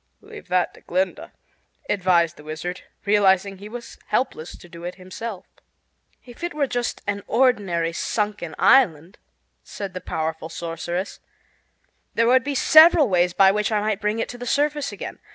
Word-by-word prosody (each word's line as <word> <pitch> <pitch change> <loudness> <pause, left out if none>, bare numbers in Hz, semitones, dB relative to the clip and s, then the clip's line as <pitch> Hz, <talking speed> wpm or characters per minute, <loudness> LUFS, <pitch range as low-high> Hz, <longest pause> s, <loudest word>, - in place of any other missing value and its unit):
"Leave 425 0 -12
that 180 0 +1
to - - -17
Glinda," 185 +1 -2 0.6
advised 175 -4 +2
the 150 - -14
Wizard, 155 +4 -6 0.2
realizing 195 -1 +3
he 205 +1 -9
was 240 +1 -9
helpless 175 -10 -2
to - - -15
do 170 0 -12
it 175 +1 -5
himself. 190 +2 -7 0.8
"If 245 +6 -13
it 345 -3 -3
were 295 -2 +1
just 245 -2 -3
an 200 0 -2
ordinary 200 -10 +1
sunken 205 -4 -3
island," 180 - +3 0.4
said 200 -2 -7
the 185 - -6
powerful 160 -1 -4
sorceress, 170 +3 -5 1.0
"there 230 - +3
would 255 +2 +4
be 285 +1 -3
several 310 -1 +7
ways 180 -1 +2
by 190 +1 +6
which 210 +2 -1
I 215 - +2
might 215 0 -1
bring 210 +2 0
it 230 - -2
to 245 - -8
the 245 - -6
surface 295 +2 0
again. - - -8
200 Hz, 165 wpm, -23 LUFS, 175-240 Hz, 1.0 s, several